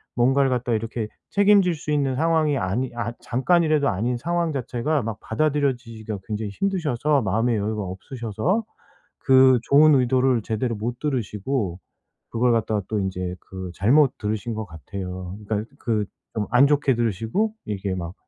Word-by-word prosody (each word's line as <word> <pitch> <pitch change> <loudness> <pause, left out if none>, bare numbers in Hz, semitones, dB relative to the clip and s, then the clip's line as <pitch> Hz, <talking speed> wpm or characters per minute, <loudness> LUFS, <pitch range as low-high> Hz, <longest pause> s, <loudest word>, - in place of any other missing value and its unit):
뭔가를 135 +3 +3
갖다가 125 -2 0
이렇게 115 0 -3 0.2
책임질 200 -4 +4
수 150 0 -5
있는 140 -3 +1
상황이 155 -1 +2
아니 100 +7 -1
아 120 0 -3
잠깐이라도 155 +3 +2
아닌 120 +6 -1
상황 170 +4 -1
자체가 135 +2 -1
막 110 -1 -4 0.3
받아들여지기가 125 -6 -2 0.2
굉장히 105 -1 -3
힘드셔서 150 - 0
마음의 110 +4 +1
여유가 105 +1 -2
없으셔서 115 - -2 0.6
그 130 -1 +6
좋은 150 +2 +6
의도를 130 -2 +2
제대로 115 +2 -2
못 120 +3 -4
들으시고 110 - -2 0.5
그걸 120 +1 +2
갖다가 110 -2 0
또 110 -2 -1
인제 90 -2 -3
그 95 -1 -8
잘못 130 - +4
들으신 110 +1 -3
것 110 0 -4
같아요. 90 +2 -7
그러니까 110 +1 -2
그 110 -4 -1 0.3
좀 105 -2 -1
안 125 +4 +5
좋게 145 -2 +2
들으시고 115 - -1
이게 100 -2 -3
막 85 -1 -5
120 Hz, 350 characters per minute, -23 LUFS, 105-140 Hz, 0.6 s, 그